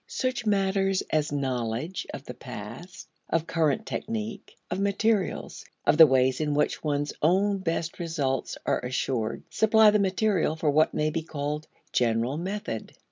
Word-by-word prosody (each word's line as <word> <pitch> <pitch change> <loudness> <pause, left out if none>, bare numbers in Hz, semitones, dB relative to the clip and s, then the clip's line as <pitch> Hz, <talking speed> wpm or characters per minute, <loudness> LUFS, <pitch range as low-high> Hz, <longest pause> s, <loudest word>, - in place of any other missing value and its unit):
Such 255 -3 -2
matters 195 -1 +2
as 150 -1 +1
knowledge 130 +3 -2
of - - -7
the - - -7
past, - - -9 0.2
of 165 0 +1
current 165 +6 +1
technique, 215 -2 -5
of 180 - -1
materials, 200 0 0 0.2
of 155 - +3
the 160 - +11
ways 130 0 +2
in 150 -1 0
which 150 - 0
one's 145 -1 -1
own 195 +5 +3
best 165 -2 -2
results 150 -6 -2
are - - +1
assured, 125 -2 -2
supply 220 0 +5
the 210 - +3
material 195 -4 +1
for 155 -2 +1
what 155 +2 +3
may 155 0 +1
be 165 - -1
called 150 -1 -4 0.3
general 120 +3 +1
method. 185 - -4
160 Hz, 150 wpm, -27 LUFS, 145-195 Hz, 0.3 s, the